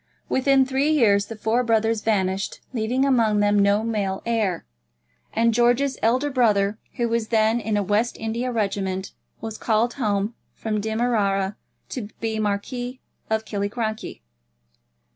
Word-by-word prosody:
Within 270 Hz, 0 st, +4 dB
three 270 Hz, +3 st, +1 dB
years 205 Hz, -9 st, +3 dB
the 225 Hz, -, -7 dB
four 225 Hz, +3 st, +1 dB
brothers 225 Hz, -1 st, +1 dB
vanished, 195 Hz, -3 st, 0 dB
leaving 245 Hz, +3 st, +1 dB
among 230 Hz, -6 st, +3 dB
them 205 Hz, 0 st, +3 dB
no 200 Hz, +2 st, +3 dB
male 205 Hz, -4 st, -2 dB
heir, 215 Hz, -7 st, 0 dB, 0.7 s
and 230 Hz, +1 st, +2 dB
George's 245 Hz, +4 st, +2 dB
elder 255 Hz, +6 st, +2 dB
brother, 210 Hz, -5 st, +2 dB, 0.2 s
who 240 Hz, -3 st, 0 dB
was 230 Hz, -1 st, -1 dB
then 220 Hz, +1 st, +2 dB
in 215 Hz, -2 st, -1 dB
a 205 Hz, -, +1 dB
West 210 Hz, +5 st, 0 dB
India 230 Hz, +3 st, -2 dB
Regiment, 195 Hz, -4 st, -2 dB, 0.3 s
was 220 Hz, -1 st, -6 dB
called 230 Hz, +1 st, +1 dB
home 210 Hz, -3 st, -1 dB, 0.2 s
from 215 Hz, -2 st, -2 dB
Demerara 210 Hz, -3 st, 0 dB, 0.3 s
to 220 Hz, -6 st, -5 dB
be 220 Hz, -1 st, -2 dB
Marquis 245 Hz, +5 st, -2 dB, 0.3 s
of 220 Hz, 0 st, 0 dB
Killiecrankie. 215 Hz, -, -3 dB
220 Hz, 140 wpm, -23 LUFS, 205-240 Hz, 0.7 s, Within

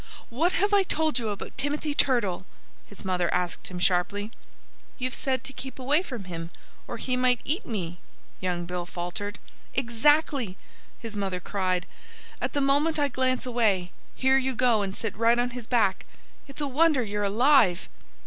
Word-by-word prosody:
"What 325 Hz, +10 st, +1 dB
have 405 Hz, +2 st, +1 dB
I 405 Hz, -, +6 dB
told 315 Hz, -7 st, +1 dB
you 225 Hz, -2 st, -2 dB
about 205 Hz, -, -6 dB
Timothy 290 Hz, +2 st, -1 dB
Turtle?" 235 Hz, -11 st, +1 dB, 0.4 s
his 205 Hz, -, -12 dB
mother 180 Hz, -2 st, +1 dB
asked 180 Hz, -1 st, -1 dB
him 180 Hz, -, -6 dB
sharply. 190 Hz, +4 st, +1 dB, 0.7 s
"You've 255 Hz, 0 st, -2 dB
said 260 Hz, -2 st, -1 dB
to 270 Hz, 0 st, -5 dB
keep 265 Hz, 0 st, -8 dB
away 280 Hz, +5 st, +2 dB
from 250 Hz, -, -6 dB
him, 165 Hz, -2 st, -6 dB, 0.4 s
or 235 Hz, -, -5 dB
he 255 Hz, +2 st, -1 dB
might 250 Hz, -1 st, +3 dB
eat 320 Hz, +9 st, -1 dB
me," 175 Hz, -6 st, -3 dB, 0.4 s
young 175 Hz, -2 st, -2 dB
Bill 175 Hz, 0 st, -4 dB
faltered. 185 Hz, +4 st, -5 dB, 0.4 s
"Exactly!" 255 Hz, -3 st, +2 dB, 0.4 s
his 225 Hz, -3 st, -8 dB
mother 195 Hz, -3 st, -2 dB
cried. 185 Hz, -1 st, -1 dB, 0.6 s
"And -, -, -1 dB
the 285 Hz, -, 0 dB
moment 285 Hz, +4 st, +2 dB
I 290 Hz, -1 st, +2 dB
glance 255 Hz, 0 st, 0 dB
away, 215 Hz, -8 st, +1 dB, 0.2 s
here 265 Hz, +1 st, +4 dB
you 265 Hz, -1 st, -1 dB
go 235 Hz, -3 st, +3 dB
and 195 Hz, -1 st, -3 dB
sit 225 Hz, -3 st, -4 dB
right 230 Hz, +2 st, +4 dB
on 245 Hz, +1 st, +1 dB
his 240 Hz, -2 st, -7 dB
back! 205 Hz, -6 st, +1 dB, 0.4 s
It's 275 Hz, +2 st, -8 dB
a 290 Hz, -, 0 dB
wonder 290 Hz, -1 st, +3 dB
you're 210 Hz, -1 st, -3 dB
alive." 210 Hz, -2 st, +4 dB
235 Hz, 170 wpm, -27 LUFS, 190-270 Hz, 0.7 s, I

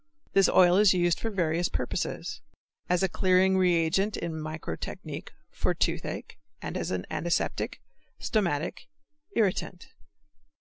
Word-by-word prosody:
This 195 Hz, -1 st, +5 dB
oil 180 Hz, 0 st, +6 dB
is 205 Hz, -2 st, +6 dB
used 175 Hz, -1 st, +2 dB
for 225 Hz, -, -2 dB
various 175 Hz, -4 st, 0 dB
purposes; -, -, -3 dB, 0.5 s
as 180 Hz, +1 st, +2 dB
a -, -, +4 dB
clearing 185 Hz, +1 st, +3 dB
reagent 180 Hz, +2 st, +2 dB
in 170 Hz, -, -3 dB
microtechnique, 155 Hz, -, -6 dB, 0.2 s
for -, -, -1 dB
toothache, -, -, -2 dB, 0.2 s
as -, -, -3 dB
an 90 Hz, -1 st, -2 dB
antiseptic, 170 Hz, 0 st, -1 dB, 0.4 s
stomachic, 175 Hz, -7 st, -1 dB, 0.5 s
irritant. 190 Hz, -3 st, 0 dB
180 Hz, 110 wpm, -28 LUFS, 165-190 Hz, 0.5 s, oil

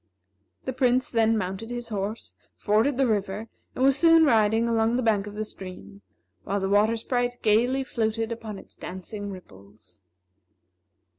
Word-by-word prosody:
The 260 Hz, -, -2 dB
Prince 255 Hz, 0 st, +1 dB
then 225 Hz, -1 st, +3 dB
mounted 195 Hz, +3 st, -4 dB
his 240 Hz, -1 st, -5 dB
horse, 210 Hz, +1 st, -4 dB, 0.2 s
forded 225 Hz, +6 st, +2 dB
the 270 Hz, -, +3 dB
river, 210 Hz, -1 st, -2 dB, 0.3 s
and 255 Hz, -, -1 dB
was 270 Hz, -1 st, +5 dB
soon 330 Hz, -1 st, +6 dB
riding 225 Hz, -2 st, +3 dB
along 225 Hz, 0 st, +2 dB
the 255 Hz, -, 0 dB
bank 210 Hz, -3 st, +1 dB
of 205 Hz, -, -8 dB
the 215 Hz, -, -2 dB
stream, 195 Hz, 0 st, -10 dB, 0.4 s
while 200 Hz, +1 st, -1 dB
the 190 Hz, -, -1 dB
Water 210 Hz, +3 st, +3 dB
Sprite 245 Hz, +1 st, -1 dB
gayly 245 Hz, +5 st, +3 dB
floated 225 Hz, -2 st, -2 dB
upon 225 Hz, -3 st, -6 dB
its -, -, -14 dB
dancing 200 Hz, +3 st, -7 dB
ripples. 105 Hz, -, -14 dB
220 Hz, 155 wpm, -26 LUFS, 200-240 Hz, 0.4 s, soon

